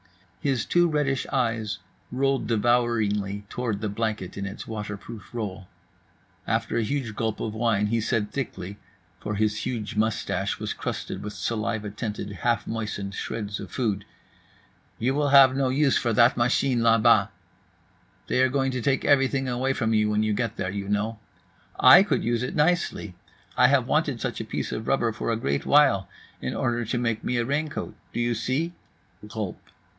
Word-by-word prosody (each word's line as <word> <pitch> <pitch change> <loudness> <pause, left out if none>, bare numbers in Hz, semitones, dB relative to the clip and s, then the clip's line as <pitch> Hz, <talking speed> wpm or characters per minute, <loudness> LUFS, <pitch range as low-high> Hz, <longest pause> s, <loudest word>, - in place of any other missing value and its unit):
His 135 -5 0
two 175 0 +3
reddish 145 -4 0
eyes 115 -5 0 0.3
rolled 135 +1 0
devouringly 105 -3 +1
toward 115 -5 -2
the 110 - -1
blanket 105 -3 -3
in 100 0 -4
its 95 - -7
waterproof 105 0 -7
roll. 100 -5 -5 0.8
After - - 0
a - - +2
huge 115 -1 -2
gulp 110 -1 -2
of 110 - -3
wine 110 -2 +1
he 115 +2 0
said 105 -1 -1
thickly 100 -7 -5 0.4
(for 105 - -4
his 105 +1 +1
huge 110 -4 -4
moustache 110 0 0
was - - -3
crusted - - -4
with 105 0 -6
saliva 110 -2 -2
tinted 105 -1 -5
half 120 +4 0
moistened 105 -3 -4
shreds 105 0 -4
of - - -7
food), 105 -6 -1 0.9
"You 125 +4 0
will 145 0 +1
have 135 -1 +7
no 135 -1 +1
use 140 +1 +3
for 120 -2 0
that 120 +3 +5
machine 125 +1 +2
là 115 -1 +5
bas. - - +5 1.0
They 125 - +1
are 130 - +4
going 135 0 0
to 125 -1 -3
take 135 +3 +1
everything 135 -1 +3
away 130 +2 0
from 110 -4 0
you 105 -1 +3
when 105 0 +1
you 110 -1 +1
get 115 +1 -1
there, 95 - -3
you 100 0 -4
know. 105 +2 -1 0.6
I 180 - +9
could 205 - +1
use 120 0 0
it 125 - -3
nicely. 150 - +1 0.4
I - - +6
have - - +3
wanted - - +1
such - - -3
a - - -5
piece - - -3
of 110 - -4
rubber 120 -4 +2
for 115 +1 -3
a 115 - 0
great 70 -10 -2
while, 135 -10 +4 0.3
in - - -3
order 120 0 0
to 120 +3 -2
make 115 -2 -1
me 125 - 0
a 120 - +1
raincoat. 145 +3 -2 0.2
Do - - -4
you 120 0 +1
see?" 130 +9 -1 0.5
(Gulp. 105 -4 -5
115 Hz, 180 wpm, -26 LUFS, 105-130 Hz, 1.0 s, I